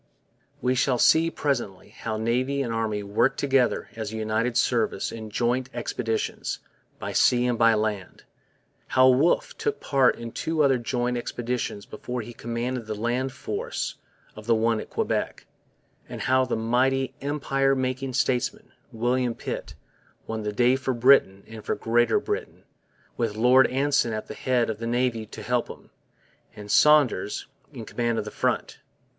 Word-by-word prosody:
We 125 Hz, 0 st, +2 dB
shall 130 Hz, 0 st, +2 dB
see 160 Hz, +6 st, +5 dB
presently 120 Hz, -, -3 dB
how 110 Hz, -1 st, -5 dB
Navy 130 Hz, +5 st, 0 dB
and 115 Hz, -3 st, -3 dB
Army 110 Hz, -2 st, -1 dB
worked 105 Hz, +6 st, +1 dB
together 135 Hz, -3 st, +1 dB
as 110 Hz, -2 st, -5 dB
a 110 Hz, -, -5 dB
united 110 Hz, +2 st, 0 dB
service -, -, +1 dB
in 110 Hz, -1 st, -7 dB
'joint 120 Hz, +4 st, 0 dB
expeditions' 115 Hz, -2 st, -2 dB, 0.4 s
by -, -, -5 dB
sea 125 Hz, 0 st, +4 dB
and 120 Hz, -2 st, 0 dB
land, 110 Hz, -4 st, +1 dB, 0.6 s
how 130 Hz, 0 st, +5 dB
Wolfe 140 Hz, +7 st, +2 dB
took 440 Hz, -1 st, -1 dB
part 135 Hz, -3 st, +3 dB
in 115 Hz, -1 st, -7 dB
two 160 Hz, +4 st, 0 dB
other 135 Hz, -3 st, +3 dB
joint 120 Hz, +1 st, -1 dB
expeditions 120 Hz, -3 st, -3 dB
before 125 Hz, +3 st, -5 dB
he 120 Hz, +2 st, -9 dB
commanded 120 Hz, +1 st, -4 dB
the 110 Hz, -, -3 dB
land 120 Hz, +5 st, -1 dB
force -, -, -4 dB, 0.4 s
of 110 Hz, +1 st, -11 dB
the 115 Hz, -, +4 dB
one 115 Hz, 0 st, +1 dB
at -, -, -8 dB
Quebec, -, -, -2 dB, 0.6 s
and -, -, -6 dB
how 130 Hz, 0 st, +3 dB
the 125 Hz, -, -2 dB
mighty 130 Hz, +3 st, +1 dB
empire 135 Hz, -1 st, +1 dB
making 130 Hz, 0 st, -2 dB
statesman, 130 Hz, -, -1 dB, 0.2 s
William 120 Hz, +1 st, 0 dB
Pitt, -, -, -6 dB, 0.5 s
won 110 Hz, -1 st, -4 dB
the 105 Hz, 0 st, -2 dB
day 120 Hz, +4 st, +3 dB
for 130 Hz, -1 st, -2 dB
Britain 120 Hz, -6 st, +4 dB
and 110 Hz, -1 st, -10 dB
for -, -, -1 dB
Greater 120 Hz, +1 st, +2 dB
Britain, -, -, -5 dB, 0.5 s
with 115 Hz, -3 st, -1 dB
Lord 125 Hz, +4 st, +5 dB
Anson 135 Hz, -3 st, +1 dB
at 110 Hz, -, -4 dB
the -, -, -6 dB
head 125 Hz, -2 st, 0 dB
of 110 Hz, -, -7 dB
the 115 Hz, -, -4 dB
Navy 120 Hz, -2 st, 0 dB
to 110 Hz, 0 st, -9 dB
help 120 Hz, +1 st, 0 dB
him, -, -, -12 dB, 0.6 s
and 105 Hz, -1 st, -8 dB
Saunders 150 Hz, -2 st, +4 dB, 0.3 s
in -, -, -8 dB
command 120 Hz, -1 st, -1 dB
at 105 Hz, -, -2 dB
the 105 Hz, -, -6 dB
front. -, -, -2 dB
120 Hz, 160 wpm, -25 LUFS, 115-130 Hz, 0.6 s, see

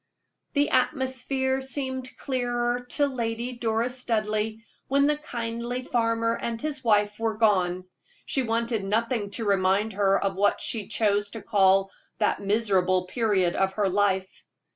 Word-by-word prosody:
The 285 Hz, 0 st, +2 dB
atmosphere 265 Hz, 0 st, 0 dB
seemed 260 Hz, -1 st, -4 dB
clearer 245 Hz, -2 st, -1 dB
to 290 Hz, -, +3 dB
Lady 240 Hz, -2 st, -3 dB
Doris 235 Hz, +2 st, -1 dB
Studleigh 215 Hz, -2 st, -1 dB, 0.3 s
when 280 Hz, +1 st, +3 dB
the 300 Hz, +1 st, +3 dB
kindly 240 Hz, -3 st, -4 dB
farmer 230 Hz, -1 st, +1 dB
and 230 Hz, -1 st, -3 dB
his 295 Hz, 0 st, -4 dB
wife 210 Hz, -2 st, +2 dB
were 225 Hz, -1 st, -1 dB
gone; 185 Hz, -5 st, +2 dB, 0.4 s
she 270 Hz, -, 0 dB
wanted 230 Hz, -2 st, -1 dB
nothing 220 Hz, +1 st, 0 dB
to 230 Hz, -, -3 dB
remind 200 Hz, +2 st, +2 dB
her 195 Hz, -1 st, +3 dB
of 195 Hz, -1 st, -1 dB
what 200 Hz, +2 st, +2 dB
she 215 Hz, -4 st, -2 dB
chose 205 Hz, -1 st, +1 dB
to -, -, -9 dB
call 195 Hz, -2 st, +3 dB, 0.3 s
that 210 Hz, -, +1 dB
miserable 195 Hz, -3 st, +1 dB
period 195 Hz, -5 st, +1 dB
of 190 Hz, 0 st, +1 dB
her 200 Hz, -1 st, +1 dB
life. 190 Hz, -1 st, 0 dB
225 Hz, 140 wpm, -26 LUFS, 205-250 Hz, 0.4 s, to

